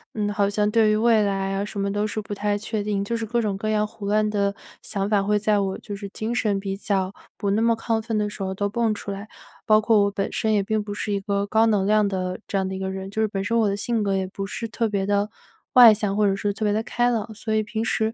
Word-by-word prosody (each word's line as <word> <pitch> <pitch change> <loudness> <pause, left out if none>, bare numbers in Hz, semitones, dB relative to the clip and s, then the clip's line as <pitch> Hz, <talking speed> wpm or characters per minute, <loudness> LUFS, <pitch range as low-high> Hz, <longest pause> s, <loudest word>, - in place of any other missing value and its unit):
嗯， 210 -1 0
好 200 -1 +2
像 210 0 +1
对 220 -1 +4
于 215 - +3
未 225 -1 +4
来 195 -1 0
啊 195 - -1
什 205 0 -6
么 200 0 0
都 205 +1 0
是 215 - -3
不 210 -1 -6
太 205 0 0
确 215 0 -3
定， 200 -1 -1
就 235 - -2
是 230 - -2
各 240 +2 0
种 205 -3 -1
各 215 +2 -3
样 215 -1 +2
胡 210 -1 -8
乱 215 +1 +2
的 200 -1 0 0.3
想 195 -2 -3
法， 205 -1 +2
会 210 +1 +2
在 210 0 +2
我， 195 -1 -1
就 205 -1 -7
是 200 0 -7
精 220 +4 -4
神 210 -4 +1
比 195 -1 -3
较 195 -1 -1 0.2
不 200 -2 -1
那 215 +2 +2
么 230 0 +3
亢 225 -1 -1
奋 220 -1 -2
的 210 0 +1
时 205 - -9
候 190 0 -2
都 205 +1 0
蹦 225 +1 0
出 205 -1 -6
来。 200 +2 -6 0.4
包 215 0 +6
括 215 -1 +4
我 200 - +1
本 195 0 -2
身 220 - 0
也 205 - +3
并 215 +1 -1
不 205 -1 -5
是 205 0 -3
一 200 - 0
个 200 0 -1
高 220 +2 +3
能 205 -3 +2
量 210 0 +3
的 185 -2 -3
这 200 - -1
样 190 -1 0
的 190 - -4
一 - - -5
个 190 0 -2
人， 190 0 -5
就 220 - -1
是 220 - +3
本 195 -2 -3
身 230 +3 0
我 220 -3 +3
的 200 - -1
性 230 0 -1
格 195 -1 +1
也 190 - -1
不 195 +1 -5
是 230 +3 -4
特 230 0 -1
别 195 -2 -1
地 205 +1 +1 0.4
外 240 -4 +10
向， 205 -1 -2
或 210 - +3
者 195 - +2
是 205 +1 -1
特 215 +2 -3
别 205 - +2
地 220 - +1
开 240 +1 +1
朗。 220 -1 -2
所 220 +1 -3
以 215 - +3
平 220 +1 -3
时， 220 0 0
210 Hz, 320 characters per minute, -24 LUFS, 200-220 Hz, 0.4 s, 外